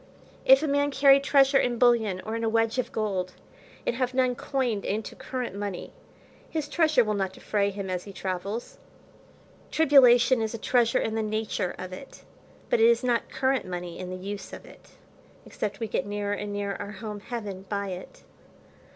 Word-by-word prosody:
If 265 +3 +7
a - - 0
man 285 0 +2
carry 275 0 +6
treasure 275 -1 +4
in 240 -1 0
bullion, 225 -6 +3
or 220 +1 -3
in 230 - -3
a 225 - +2
wedge 225 +2 +1
of 255 - -2
gold, 190 -4 -2 0.5
and - - 0
have 255 -1 -1
none 255 -1 +3
coined 245 -5 -2
into 210 +2 -3
current 250 -6 -5
money, 200 -3 -5 0.6
his 310 -2 -3
treasure 310 -4 +3
will 215 -1 -1
not 195 -2 -2
defray 200 +1 0
him 200 -1 -5
as 180 -1 -3
he 200 - -8
travels. 195 +4 -5 0.9
Tribulation 260 -5 +5
is 220 +1 -2
treasure 235 -1 +2
in 220 - -1
the 225 - 0
nature 215 -4 -2
of 185 0 -7
it, 265 +9 -11 0.4
but - - +2
it 455 +1 +6
is 470 - +2
not 240 -2 0
current 265 -5 0
money 175 -1 -6
in 185 -1 -5
the 185 - -4
use 200 +2 -7
of - - -9
it, - - -16 0.6
except 200 -1 -4
we 225 - -2
get 195 -2 -2
nearer 205 0 -2
and 205 0 -4
nearer 200 -1 -3
our 205 0 -6
home, 210 0 -6
heaven, 205 -4 -6
by 200 -1 -2
it. 185 0 -9
220 Hz, 185 wpm, -27 LUFS, 200-255 Hz, 0.9 s, If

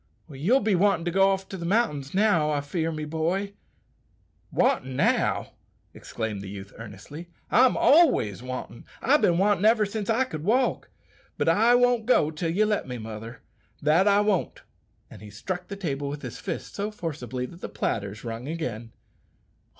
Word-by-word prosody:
"You'll 175 - +2
be 215 -1 +1
wantin' 185 -2 +2
to 175 - 0
go 195 +2 +4
off 195 0 -1
to 190 - -6
the 170 - -7
mountains 170 - 0
now, 190 -7 +3
I 145 -1 0
fear 160 +3 -2
me, 155 -1 -4
boy." 170 +6 -2 1.0
"Wantin' 130 0 +1
now!" - - +1 0.4
exclaimed 110 -4 -5
the 100 - -8
youth 100 0 -9
earnestly; 115 - -10 0.2
"I'm 250 +4 +5
always 260 - +4
wantin'. 125 -1 -7
I've 285 +5 +3
bin 170 - +3
wantin' 200 0 +2
ever 220 0 +4
since 205 +1 -5
I 230 +4 +3
could 155 - -6
walk; 245 +7 +1 0.5
but - - -1
I 225 +9 +5
won't 245 -2 +2
go 155 -11 +3
till 165 +2 -3
you 200 +6 +2
let 210 -7 -1
me, 125 -1 -5
mother, 110 +1 -8 0.4
that 160 +7 +3
I 205 0 +5
won't!" 205 -4 -1 0.5
And - - -12
he 105 - -10
struck 175 - -5
the 200 - -6
table 145 -7 -3
with 145 0 -6
his - - -7
fist 175 -4 -5
so 205 +1 -3
forcibly 135 - -5
that 170 +7 -12
the - - -5
platters 100 0 -3
rung 115 +2 -6
again. 120 -8 -5
165 Hz, 175 wpm, -26 LUFS, 130-205 Hz, 1.0 s, I'm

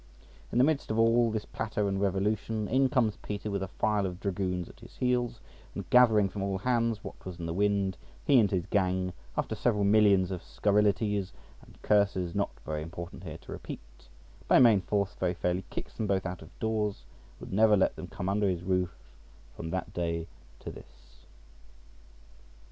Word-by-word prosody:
In - - -1
the 125 - +6
midst 150 0 +1
of 110 - -1
all 115 +1 +4
this 110 -1 -3
platter 105 -2 -2
and 95 0 -1
revolution 105 +2 0
in 135 0 +3
comes 120 -7 +1
Peter 105 0 -5
with 100 -1 -1
a 95 - -2
file 105 +1 0
of 90 -1 -7
dragoons 90 -3 -2
at - - -15
his - - -14
heels, 125 -2 0 0.4
and - - -5
gathering 110 -5 +6
from 100 +1 -6
all 100 -1 -1
hands 115 0 0
what - - -9
was 90 -2 -7
in 85 - -4
the 85 - -2
wind, 100 0 +1 0.3
he 140 -3 +6
and 105 -3 +4
his 90 -3 -1
gang, 95 -2 0 0.2
after - - -1
several 105 -4 +1
millions 100 -3 +4
of 90 -2 -4
scurrilities 105 -1 +1 0.3
and - - -18
curses 100 -4 +2
not 100 0 0 0.2
very 75 0 -3
important 85 +2 -8
here 80 -2 -6
to - - -13
repeat, - - -9 0.4
by - - +6
main 115 -6 +6
force 100 0 -1
very 90 -1 0
fairly 90 +1 -1
kicks - - -6
them 110 - -3
both 95 -2 0
out 90 -1 -4
of 80 - -11
doors, 105 - -1 0.3
and - - -23
would - - -7
never 105 +1 +5
let 95 - +2
them - - -7
come 90 - -5
under 100 +1 +2
his 90 -1 -2
roof 90 -1 +1 0.7
from 80 - -6
that 95 +1 -3
day 85 -1 -2 0.4
to - - -6
this. - - -17
100 Hz, 190 wpm, -29 LUFS, 90-110 Hz, 0.7 s, the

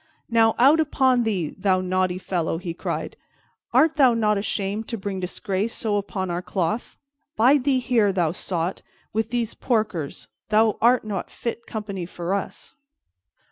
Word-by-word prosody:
"Now, 225 -1 +4
out 280 +6 +6
upon 265 -5 +3
thee, 185 -8 -1
thou 190 -1 +2
naughty 185 0 0
fellow!" 175 -3 -2
he 170 0 -5
cried. - - -4 0.6
"Art 300 +6 +4
thou 260 -5 +5
not 210 -2 +2
ashamed 200 +1 -2
to 230 - -3
bring 195 -1 -4
disgrace 190 +4 -2
so 210 -3 0
upon 190 -2 -3
our 175 +1 -2
cloth? 190 +5 -2 0.4
Bide 255 +4 +4
thee 275 -2 +3
here, 240 -5 +2
thou 175 -4 +1
sot, 175 0 -3 0.3
with 220 +1 0
these 235 -2 -1
porkers. 215 - -2 0.2
Thou 215 0 +4
art 245 +2 +4
no 200 -4 -2
fit 235 0 -5
company 200 -5 -5
for 175 +1 -4
us." 200 - -5
210 Hz, 155 wpm, -24 LUFS, 185-235 Hz, 0.6 s, out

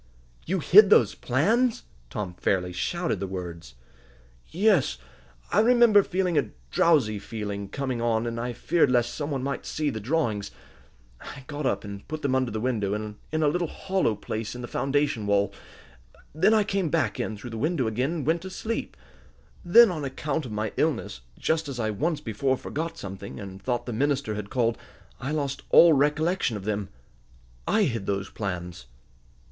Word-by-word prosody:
"You 190 +4 +1
hid 200 +6 +8
those 120 - +5
plans!" 220 - +1 0.3
Tom 95 +1 -4
fairly 90 0 -1
shouted 170 - -1
the 95 - -3
words. 85 -8 -7 0.7
"Yes, 185 - +2 0.5
I - - +3
remember 235 -3 +6
feeling 180 -4 0
a 120 -7 -2 0.2
drowsy 130 -11 +3
feeling 100 -2 -5
coming 130 -4 -3
on, 115 -1 +1
and 115 0 -3
I 120 +1 -2
feared 145 +5 +2
lest 120 -1 +2
some 145 -1 -4
one 135 -3 -2
might 140 +1 -3
see 150 -2 -2
the 110 - -5
drawings. 110 -5 -1 0.7
I 140 - -9
got 145 0 -3
up - - -1
and 100 -1 -8
put 155 +1 -5
them 140 -2 +1
under 130 -2 +1
the 110 - -3
window, 110 -4 -1
in 105 +9 -4
a - - +4
little, 175 +3 0
hollow 190 - -1
place 110 +2 -5
in 125 - -7
the - - -5
foundation 140 -6 0
wall. 100 -1 +2 0.8
Then 175 +8 +3
I 215 - +4
came 195 -4 -1
back 135 -10 0
in 110 - -3
through 120 +4 -8
the 115 - -5
window 155 -1 0
again, 125 +6 0
and 160 -6 -3
went 165 +2 +1
to 190 - -7
sleep. 225 +4 -4 0.7
Then, 220 +4 +7
on 155 -4 -4
account 140 +1 -3
of - - -9
my 105 0 -2
illness, 135 - -1 0.2
just 160 -2 0
as 130 -3 -5
I 110 -2 0
once 155 - -1
before 130 +4 0
forgot 160 +5 -4
something, 100 0 -7
and 95 -1 -8
thought 120 -2 -2
the 120 - -4
minister 140 -1 0
had 105 -1 -5
called, 115 -2 0 0.4
I 135 - -4
lost 145 -3 -2
all 170 -1 +8
recollection 150 - +1
of 95 - -9
them. 105 -2 -2 0.8
I 220 - +3
hid 115 - -2
those 100 -1 -2
plans." 90 - -5
130 Hz, 180 wpm, -26 LUFS, 105-160 Hz, 0.8 s, hid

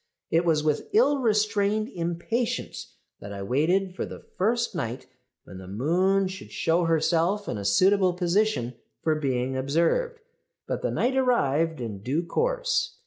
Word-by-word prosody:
"It 165 +2 +3
was 155 -3 +2
with 150 -1 -1
ill 290 -10 +4
restrained 215 -2 +1
impatience 175 +7 -3 0.2
that 100 - -9
I 100 -1 -5
waited 175 - +1
for - - -3
the - - -7 0.2
first 235 +5 0
night 125 -7 -4 0.4
when 95 - -11
the 95 - -10
moon 180 - +1
should 185 0 -9
show 170 +1 +1
herself 165 +5 +1
in 105 - -3
a - - -5
suitable 185 - +3
position 180 - 0 0.3
for 160 - +2
being 130 -3 -1
observed; 170 - 0 0.5
but - - -3
the - - -1
night 260 +2 0
arrived 165 - +1
in 110 -5 -5
due 140 - -1
course. - - 0
175 Hz, 150 wpm, -26 LUFS, 140-210 Hz, 0.5 s, ill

